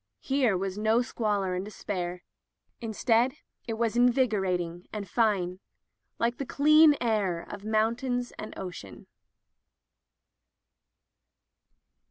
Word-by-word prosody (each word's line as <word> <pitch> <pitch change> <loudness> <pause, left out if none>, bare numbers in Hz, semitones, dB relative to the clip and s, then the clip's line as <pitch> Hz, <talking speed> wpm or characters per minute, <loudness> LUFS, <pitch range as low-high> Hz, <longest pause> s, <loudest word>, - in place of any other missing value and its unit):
Here 265 -8 +2
was 195 +2 -3
no 220 +3 +3
squalor 205 -6 -1
and 180 +1 -2
despair. 180 -4 -5 0.6
Instead 230 +3 +1 0.3
it 230 - -2
was 230 -1 0
invigor 240 -5 +3
ating 175 -1 -3
and 205 -2 -5
fine, 190 -4 +1 0.6
like 235 +1 0
the - - -1
clean 305 +1 +6
air 205 -8 0
of 205 -1 -8
moun 220 +1 +2
tains 245 -1 -2
and 215 - -7
oceans. 175 - -8
215 Hz, 110 wpm, -28 LUFS, 190-240 Hz, 0.6 s, clean